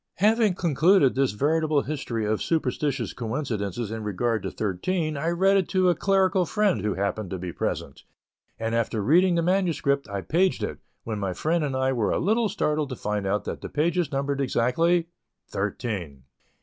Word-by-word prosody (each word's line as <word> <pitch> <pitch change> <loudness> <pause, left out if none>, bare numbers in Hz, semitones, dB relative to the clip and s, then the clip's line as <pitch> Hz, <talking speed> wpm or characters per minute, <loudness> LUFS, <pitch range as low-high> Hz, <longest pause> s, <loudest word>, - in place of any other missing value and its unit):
Having 215 -1 +3
concluded 170 -2 +3
this 135 -2 +1
veritable 150 +4 +1
history 125 -7 -3
of 110 0 0
superstitious 135 - -1
coincidences 115 -3 -3
in 110 -1 -4
regard 110 +2 -1
to - - -3
thirteen, 155 - -2
I 140 +3 -2
read 190 +3 +3
it 190 - 0
to 185 -1 +3
a 175 - +3
clerical 195 -1 +2
friend, 210 - +1
who 105 -1 -1
happened 100 0 -2
to 95 - -4
be 90 -1 -6
present; - - -3 0.6
and 115 0 -2
after 115 -1 0
reading 175 - +4
the 170 - +1
manuscript, 165 - +1
I 100 -1 -3
paged 180 - +1
it, - - -4 0.2
when 110 -2 -4
my 95 -2 -2
friend 160 - 0
and 140 -3 -2
I 130 0 +1
were 115 -5 0
a - - +1
little 220 +4 +1
startled 150 -7 -1
to 130 - -4
find 105 -3 -2
that 105 +2 -2
the - - -6
pages 170 +3 0
numbered 140 0 -1
exactly 165 +7 +2 0.4
thirteen. 95 - -4
140 Hz, 175 wpm, -25 LUFS, 110-175 Hz, 0.6 s, reading